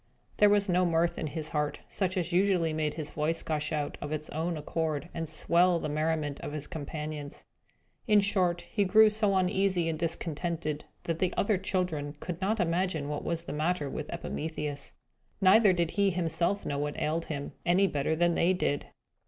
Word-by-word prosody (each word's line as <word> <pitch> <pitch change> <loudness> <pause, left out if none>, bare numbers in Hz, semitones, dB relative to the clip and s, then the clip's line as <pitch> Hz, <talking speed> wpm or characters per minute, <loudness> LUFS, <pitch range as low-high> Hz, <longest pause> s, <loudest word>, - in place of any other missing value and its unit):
There 210 - +6
was 205 0 +3
no 180 0 +3
mirth 170 0 +1
in 155 - -2
his 155 +1 -4
heart, 150 -1 -2
such 190 -1 -2
as 175 -1 -1
usually 180 -3 +3
made 155 -1 -1
his 155 -2 -5
voice 155 +2 -1
gush 150 -1 -2
out, 150 -2 -2
of 145 - -5
its 155 0 -4
own 165 +2 -2
accord, 155 +1 -2
and 165 -2 -4
swell 175 +2 +3
the 155 - -3
merriment 155 -1 -1
of 145 - -6
his 150 -1 -3
companions. 150 -1 -6 0.6
In 210 -2 +6
short, 185 -4 +1
he 205 - +2
grew 215 +3 +6
so 210 -2 +1
uneasy 185 -2 +2
and 160 -1 -2
discontented, 165 -2 -2 0.2
that 165 -1 -2
the 185 - +1
other 200 -2 +2
children 180 -6 -2
could 175 0 -5
not 210 +4 0
imagine 170 -4 0
what 150 -1 -3
was 165 -1 -1
the - - -6
matter 150 -2 -1
with 150 - -5
Epimetheus. 150 -3 -4 0.5
Neither 200 +2 +6
did 170 -2 0
he 200 -1 +2
himself 175 +2 0
know 140 -1 -2
what 145 0 -2
ailed 165 +2 -1
him, 145 -2 -4
any 180 +3 +4
better 150 -3 0
than 175 +1 +3
they 175 +2 +3
did. 145 -6 -1
165 Hz, 185 wpm, -29 LUFS, 150-185 Hz, 0.6 s, There